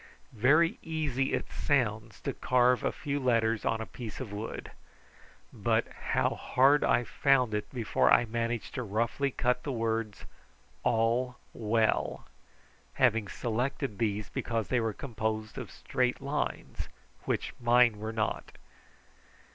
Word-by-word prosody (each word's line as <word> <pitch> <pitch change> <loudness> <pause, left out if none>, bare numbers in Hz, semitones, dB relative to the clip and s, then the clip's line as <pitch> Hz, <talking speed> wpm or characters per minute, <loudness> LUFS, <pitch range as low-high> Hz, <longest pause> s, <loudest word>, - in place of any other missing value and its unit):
Very 145 +9 +4
easy 145 -5 -1
it - - -2
sounds 110 -6 0
to - - -2
carve 125 0 +3
a - - +1
few 145 -1 -3
letters 115 -4 +1
on 110 - +1
a - - -3
piece 115 -1 -8
of 120 -6 -6
wood, 105 +2 -6 0.8
but - - +1 0.3
how - - +3
hard 140 +3 +3
I 120 - +3
found 130 -3 +2
it 105 0 -2
before 120 -5 +2
I 120 - +6
managed 115 0 -2
to - - -3
roughly 115 +5 0
cut 125 -1 0
the 145 - -3
words 115 -3 -2 0.6
"All 120 - +1 0.2
Well," 110 0 0 0.7
having 115 -5 +3
selected 120 +1 -2
these 105 -2 0
because 115 -3 -2
they 125 - +2
were 115 -1 0
composed 110 -2 -3
of - - -6
straight 125 -1 -1
lines, 140 +2 -3 0.4
which - - -1
mine 120 -2 +4
were 110 +1 -3
not. 110 -1 -2
120 Hz, 135 wpm, -30 LUFS, 110-130 Hz, 0.8 s, I